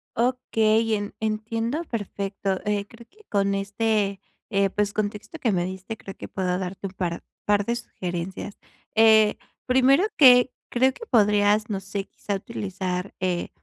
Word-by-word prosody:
Okey, 225 -2 +2
en 205 -1 -4
entiendo 225 +7 -2
perfecto, 200 - -3
eh, 205 -1 0
creo 230 +3 -16
que 430 +2 -22
con 200 -1 +1
este, 200 0 0 0.3
eh, 195 -2 +2
pues, 205 +1 0
contexto 215 +9 -4
que 230 -8 +1
me 175 -2 +1
diste, 190 +4 -6
creo 195 -2 -10
que - - -7
puedo 180 -1 -1
darte 190 +1 -4
un 185 - -11
par, 175 -3 -3 0.2
par 205 -1 +2
de 235 +2 0
sugerencias. 185 -1 -5 0.4
Eh, 220 -1 +6 0.3
primero 265 +6 +5
que 250 -2 +8 0.2
creo 260 +2 +3
que 460 - -10
podrías, 210 -1 +3
no 200 -2 -1
sé, 195 +1 -5
quizá, 205 - -5
utilizar, 190 -3 -4
eh, 180 -2 -1
205 Hz, 155 wpm, -25 LUFS, 195-225 Hz, 0.4 s, que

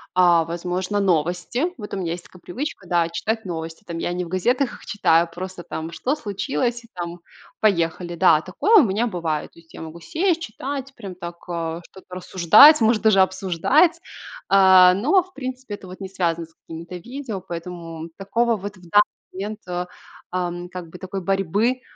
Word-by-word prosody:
а, 175 -2 +5
возможно, 180 +4 -2
новости. 180 - 0
Вот 210 -4 -8
у - - -2
меня 170 -3 -2
есть 175 0 -8
такая 180 - -17
привычка, 220 -2 -6
да, 170 -1 +2
читать 220 +6 -2
новости 165 +1 -6
там. 170 -3 -5
Я 175 - -2
не 180 0 -2
в - - -9
газетах 240 +10 0
их - - -13
читаю, 170 -5 +2
просто 185 0 -7
там: 160 0 -6
"Что 260 - -1
случилось?" 210 - -2
И - - -17
там, 175 -1 -6 0.4
поехали. 175 -3 +1
Да, 155 -2 +5
такое 290 - +1
у - - +3
меня 220 +2 0
бывает. 165 -7 -3
То - - -18
есть 165 -1 -21
я - - -9
могу 160 +1 -8
сесть, 335 - 0
читать, 270 +1 -5
прям 195 -6 -8
так, 170 -1 -7
а, 165 -1 -3
что-то 185 -1 -12
рассуждать, 190 - +7
может 220 0 +3
даже 215 -3 +5
обсуждать. 195 - +2 0.5
А, 190 -2 +7
но, 305 - +3
в 370 +1 -22
принципе, 255 - -6
это 195 - -13
вот 185 +1 -10
не 190 - -5
связано 170 -3 -1
с 165 - -29
какими-то 165 +2 -9
видео, 240 +3 -6
поэтому 170 -2 -7
такого 230 +4 0
вот 205 +1 -7
в 175 -2 -16
данный 205 +4 +6 0.3
момент, 205 +3 -5
а, 180 0 -3 0.4
ам, 175 -1 -3
как 180 -2 -8
бы 180 - -11
такой 190 +1 -5
борьбы, 195 +7 0
185 Hz, 185 wpm, -22 LUFS, 170-220 Hz, 0.5 s, рассуждать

